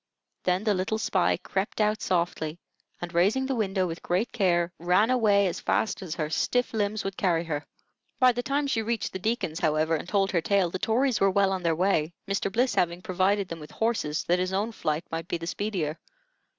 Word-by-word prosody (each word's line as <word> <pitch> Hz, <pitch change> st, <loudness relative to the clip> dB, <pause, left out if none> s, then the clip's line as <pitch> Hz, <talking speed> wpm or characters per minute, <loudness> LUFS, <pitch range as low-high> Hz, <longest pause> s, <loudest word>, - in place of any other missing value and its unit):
Then 180 Hz, +2 st, +1 dB
the 215 Hz, -2 st, +2 dB
little 190 Hz, +3 st, -1 dB
spy 195 Hz, -4 st, +1 dB
crept 190 Hz, +4 st, -3 dB
out 215 Hz, 0 st, +2 dB
softly, 170 Hz, -3 st, -1 dB, 0.4 s
and 175 Hz, 0 st, -6 dB
raising 200 Hz, +10 st, +3 dB
the 270 Hz, -, -1 dB
window 195 Hz, -5 st, 0 dB
with 165 Hz, -1 st, -5 dB
great 190 Hz, +7 st, 0 dB
care, 175 Hz, -5 st, +1 dB
ran 180 Hz, +7 st, +3 dB
away 210 Hz, -5 st, +4 dB
as 180 Hz, -, -2 dB
fast 220 Hz, -, 0 dB
as 175 Hz, -4 st, -5 dB
her 155 Hz, -3 st, -2 dB
stiff 245 Hz, +11 st, 0 dB
limbs 210 Hz, -1 st, -1 dB
would 195 Hz, -1 st, -4 dB
carry 170 Hz, -4 st, +1 dB
her. 150 Hz, -3 st, -4 dB, 0.5 s
By 255 Hz, -1 st, +6 dB
the 245 Hz, 0 st, -2 dB
time 280 Hz, +3 st, 0 dB
she 250 Hz, -5 st, 0 dB
reached 230 Hz, +1 st, -2 dB
the 190 Hz, -, -4 dB
Deacon's, 190 Hz, -6 st, -1 dB
however, 155 Hz, +1 st, +1 dB
and 165 Hz, +3 st, -5 dB
told 195 Hz, -2 st, +2 dB
her 170 Hz, -, +1 dB
tale, 190 Hz, -1 st, +2 dB
the 185 Hz, -, -3 dB
Tories 235 Hz, +4 st, +1 dB
were 195 Hz, -, +5 dB
well 195 Hz, 0 st, +2 dB
on 190 Hz, -1 st, -1 dB
their 165 Hz, -2 st, +1 dB
way, 170 Hz, -2 st, +1 dB
Mr. 195 Hz, 0 st, -1 dB
Bliss 245 Hz, +5 st, +1 dB
having 175 Hz, 0 st, 0 dB
provided 195 Hz, 0 st, +1 dB
them 165 Hz, -1 st, -7 dB
with 150 Hz, -, -10 dB
horses 220 Hz, -10 st, -1 dB
that 175 Hz, +1 st, +1 dB
his 185 Hz, +1 st, -1 dB
own 205 Hz, +4 st, 0 dB
flight 155 Hz, -6 st, -2 dB
might 165 Hz, 0 st, -4 dB
be 175 Hz, -, -1 dB
the 165 Hz, -, -7 dB
speedier. 175 Hz, -4 st, -2 dB
190 Hz, 215 wpm, -27 LUFS, 170-215 Hz, 0.5 s, By